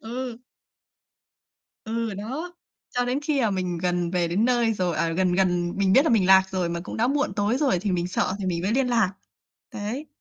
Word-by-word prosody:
Ừ. 240 +1 -5 1.5
Ừ, 225 -1 -2
đó. 270 - -5 0.4
Cho 245 0 -1
đến 250 +3 0
khi 295 -2 0
mà 225 - +2
mình 180 -2 -2
gần 175 -1 -1
về 175 -2 +1
đến 195 +7 +1
nơi 240 -2 +2
rồi, 180 -5 -1
à, 165 - +1
gần 180 +2 +1
gần 175 -2 +1
mình 195 -1 +2
biết 270 - +6
là - - +1
mình 220 -5 +3
lạc 190 0 +6
rồi 185 -3 -1
mà 170 0 -3
cũng - - -7
đã 230 +2 +2
muộn 280 -6 0
tối 205 +4 0
rồi 270 - +1
thì 205 - -1
mình 175 -1 0
sợ 185 - -1
thì 195 - -3
mình 170 -2 -1
mới 195 +4 -1
liên 260 +2 +2
lạc. 225 -6 +2 0.6
Đấy. 230 +9 -5
200 Hz, 220 wpm, -25 LUFS, 180-245 Hz, 1.5 s, biết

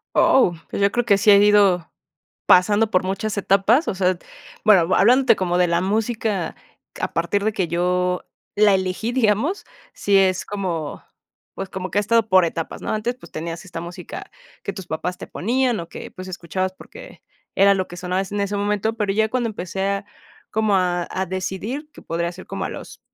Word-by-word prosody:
Oh, 185 -10 +4
pues, - - -3
yo 200 0 +4
creo 240 -1 0
que 200 -3 +4
sí 210 - +3
he 200 - +9
ido 200 -4 +4 0.6
pasando 205 +4 +5
por 185 - +2
muchas 200 +3 -3
etapas, 200 - +3
o - - 0
sea, 185 -1 +1 0.5
bueno, 185 -5 +5
hablándote 250 +6 +5
como 180 -1 0
de 180 - +4
la 170 0 +1
música, 215 -1 -1 0.5
a - - -2
partir 170 +5 0
de 220 - +1
que 190 -4 -1
yo 180 +2 0 0.3
la 205 -1 +5
elegí, 190 +4 -1
digamos, 255 - +1 0.3
sí 200 -1 +2
es 190 -1 +3
como, 180 -7 -4 0.5
pues, 195 - -5
como 185 -1 -5
que 200 - 0
ha - - +5
estado 225 +1 +2
por 185 -2 +5
etapas, 165 0 -4
¿no? - - -3
Antes, 230 +3 -2
pues, 255 - -16
tenías 165 +2 -5
esta 175 -3 -7
música 175 +1 -8 0.3
que - - -4
tus 190 -3 -9
papás 180 +2 -4
te - - -8
ponían, 245 +2 0
o 165 - -8
que, - - -9
pues, 185 0 -9
escuchabas 185 +1 -3
porque 445 - -13 0.4
era 200 +1 +6
lo 190 -1 -2
que 175 - -9
sonaba 180 +1 -2
es 195 - -5
en 205 0 -2
ese 200 0 -1
momento, 210 +2 0
pero 210 -3 0
ya 220 +2 +2
cuando 240 0 -1
empecé 190 -2 -5
a 200 0 -2 0.5
como 215 -2 +2
a 175 -2 0
a 190 0 -2
decidir, 190 - -4
que - - -14
podría 170 +1 -2
ser 185 +1 -11
como - - -4
a - - -2
los - - -9
195 Hz, 200 wpm, -22 LUFS, 180-215 Hz, 0.6 s, he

